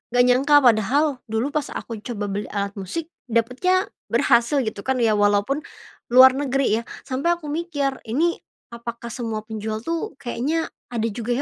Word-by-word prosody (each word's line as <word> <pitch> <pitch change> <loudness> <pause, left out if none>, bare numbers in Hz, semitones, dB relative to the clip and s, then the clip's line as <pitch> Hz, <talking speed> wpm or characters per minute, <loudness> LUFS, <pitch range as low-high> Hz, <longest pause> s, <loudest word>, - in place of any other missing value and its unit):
gak 245 - +6
nyangka 265 +4 +4
padahal 250 +5 +3
dulu 225 +6 -1
pas 300 -2 -1
aku 225 -3 -5
coba 210 -4 -3
beli 205 +1 -3
alat 200 0 -1
musik 320 - -5 0.2
dapatnya 250 - +1 0.2
berhasil 245 +3 +3
gitu 215 -2 -4
kan, 265 - +2
ya 220 - +4
walaupun 205 +8 +2 0.5
luar 255 +2 +8
negeri 275 -1 0 0.2
ya. - - -5 0.2
Sampai 285 +7 0
aku 300 -4 -7
mikir 290 -5 -2
ini 325 +9 +1 0.3
apakah 235 0 -7
semua 225 -3 -4
penjual 220 0 -5
tuh 330 -4 -3
kayaknya 285 +7 -2 0.2
ada 230 -2 -1
juga 235 +2 -4
245 Hz, 160 wpm, -23 LUFS, 225-290 Hz, 0.5 s, luar